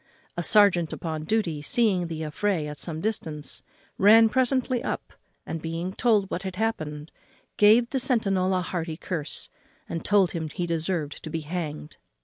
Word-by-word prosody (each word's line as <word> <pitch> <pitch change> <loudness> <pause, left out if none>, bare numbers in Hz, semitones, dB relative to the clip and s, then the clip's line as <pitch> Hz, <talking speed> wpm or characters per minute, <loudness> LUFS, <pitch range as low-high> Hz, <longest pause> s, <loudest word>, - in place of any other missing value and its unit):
A 175 - -2
serjeant 180 -4 +4
upon 155 -2 -4
duty, 170 -7 0
seeing 190 - +1
the 160 -1 -5
affray 165 +2 -1
at 150 0 -7
some 160 -2 -5
distance, 160 -8 -3 0.4
ran 220 +3 +7
presently 255 0 +1
up, - - -4 0.3
and, 165 -1 -5
being 165 +3 -4
told 210 -4 +2
what 180 - -2
had 190 -1 -5
happened, 155 -8 -3 0.5
gave 220 +3 +6
the 270 - +1
centinel 195 -7 +2
a - - 0
hearty 165 -3 -4
curse, 165 -4 -4 0.4
and 165 - -4
told 200 -4 +3
him 160 -2 -4
he 175 +4 -3
deserved 165 -2 -2
to 160 - -6
be 160 +1 -3
hanged. 155 -1 -5
180 Hz, 160 wpm, -26 LUFS, 160-210 Hz, 0.5 s, ran